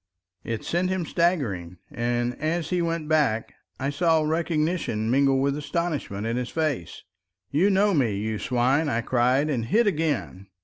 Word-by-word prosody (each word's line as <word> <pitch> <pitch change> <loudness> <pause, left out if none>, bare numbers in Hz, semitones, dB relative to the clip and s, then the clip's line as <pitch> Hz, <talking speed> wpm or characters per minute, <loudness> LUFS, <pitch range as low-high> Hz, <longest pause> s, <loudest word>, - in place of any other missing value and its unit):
It 115 -2 -4
sent 175 +2 0
him 185 -2 -1
staggering, 120 - 0
and 120 +1 -1
as 160 +1 -1
he 180 -1 +1
went 165 -2 -2
back 145 -8 +1 0.3
I 135 +2 -1
saw 160 +1 +2
recognition 155 -7 0
mingle 135 0 +3
with 140 +1 +1
astonishment 150 - -3
in 115 +1 -1
his 125 -1 -3
face. 145 - -2 0.5
"You 170 +8 +3
know 200 +1 +3
me, 125 - +2
you 110 +1 -2
swine," 130 +5 +1
I 115 -3 0
cried 125 +4 +2
and 125 -7 -1
hit 230 - +3
again. 150 - -1
145 Hz, 160 wpm, -25 LUFS, 120-165 Hz, 0.5 s, mingle